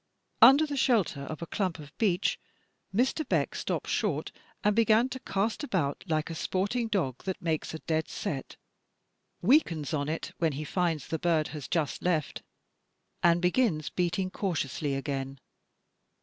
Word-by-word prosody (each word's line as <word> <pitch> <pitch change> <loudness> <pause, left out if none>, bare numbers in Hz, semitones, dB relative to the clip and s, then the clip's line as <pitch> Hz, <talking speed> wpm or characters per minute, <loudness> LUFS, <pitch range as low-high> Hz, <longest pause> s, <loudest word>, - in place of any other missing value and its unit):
Under 285 +4 +9
the 290 -2 -4
shelter 225 - +2
of 155 +4 -6
a - - -3
clump 185 -2 -2
of 145 -2 -12
beech, 195 -4 +1 0.5
Mr. 255 +9 +1
Beck - - +1
stopped - - -3
short - - -1 0.3
and 210 0 +3
began 230 +2 +4
to 260 - -5
cast 215 +3 -1
about 165 - -1
like 155 -1 0
a - - -3
sporting 200 +8 -1
dog 170 - -1
that 190 -1 -2
makes 160 -1 -2
a 160 - -10
dead 160 -1 0
set, 135 -3 -4 0.9
weakens 175 - +3
on 145 -1 -1
it 160 - -3
when 165 -3 +2
he 145 +3 -4
finds 165 -2 -1
the 160 - -3
bird 165 -3 +1
has 150 -3 -7
just 155 -5 -1
left, 160 -5 0 0.8
and 170 0 +4
begins 180 - +2
beating 180 +1 -1
cautiously 150 -7 -2
again. 135 -1 -3
170 Hz, 155 wpm, -29 LUFS, 155-205 Hz, 0.9 s, Under